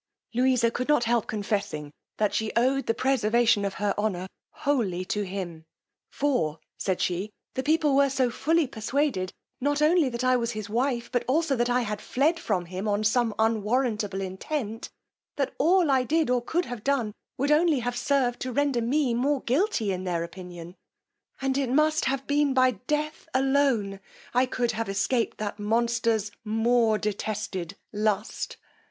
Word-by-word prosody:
Louisa 250 -1 +3
could 250 +2 -3
not 295 -5 +4
help 235 -1 +1
confessing 200 -8 -2 0.3
that 210 -1 +1
she 220 -1 -1
owed 265 +3 +2
the 230 - +3
preservation 235 -4 +2
of 200 -1 -2
her 205 0 0
honour 195 -4 -1 0.2
wholly 205 -11 -1
to 210 +1 -1
him; 180 -4 -5 0.5
for, 165 - 0 0.2
said 190 -2 -1
she, 185 +4 -1 0.2
the 260 - -1
people 300 0 +2
were 280 0 +5
so 260 -2 +1
fully 325 +6 +2
persuaded 240 -4 -1 0.3
not 290 +2 +1
only 310 -1 +4
that 240 0 -4
I 255 0 +4
was 235 -1 -2
his 215 -1 -5
wife, 240 0 0
but 245 - +1
also 295 +1 +2
that 240 0 +1
I 245 +1 +2
had 210 -3 -3
fled 310 +6 +1
from 200 - -1
him 185 +4 -5
on 205 0 +1
some 225 0 +2
unwarrantable 220 -2 0
intent, 220 +4 -4 0.5
that 275 -2 -1
all 340 0 +4
I 265 -1 +4
did, 305 +1 +1
or 250 -1 +2
could 335 +8 -1
have 245 -4 -7
done, 260 -7 0 0.2
would 280 +3 +1
only 315 0 +4
have 245 +1 -2
served 245 -1 +1
to 255 - -3
render 275 -2 +1
me 255 +2 +1
more 270 +3 +1
guilty 255 - +1
in 185 0 -3
their 175 -2 -1
opinion; 175 0 -9 0.7
and 270 0 +1
it 270 -3 0
must 305 +4 +2
have 270 0 -1
been 285 -1 +2
by 255 0 +5
death 300 - -3
alone 260 -7 +2 0.3
I 250 +1 +3
could 245 -2 0
have 225 -1 -3
escaped 200 +5 0
the 210 -1 -3
monster's 230 -1 +1
more 225 0 +2
detested 210 -4 -3 0.2
lust. 210 0 -1
240 Hz, 170 wpm, -27 LUFS, 210-275 Hz, 0.7 s, were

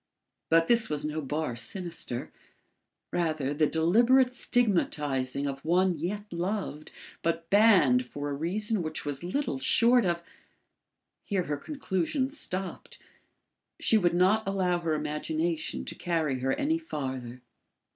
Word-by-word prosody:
But 165 0 +5
this 230 +3 +2
was 150 -1 -2
no 155 +1 -2
bar 150 -2 -2
sinister; 165 -2 -3 0.8
rather 155 -5 -1
the 150 +1 +2
deliberate 235 - +4
stigmatising 145 - 0
of 135 -1 -4
one 175 0 +2
yet 205 +4 -4
loved, 175 -3 -3 0.3
but 165 0 -2
banned 195 - +5
for 145 +2 -5
a - - -2
reason 195 +8 0
which 155 -2 -4
was 145 +1 -3
little 180 - -2
short 235 - +4
of 170 -1 -1 1.0
Here 195 -3 -1
her 150 -3 -3
conclusions 260 - -2
stopped; 190 +1 -5 0.8
she 220 - +4
would 175 -3 +2
not 190 +4 +3
allow 185 -3 +1
her 165 -2 -1
imagination 155 +2 -2
to - - -4
carry 160 -6 -1
her 135 +1 0
any 320 +3 0
farther. 130 - -5
170 Hz, 130 wpm, -28 LUFS, 150-200 Hz, 1.0 s, But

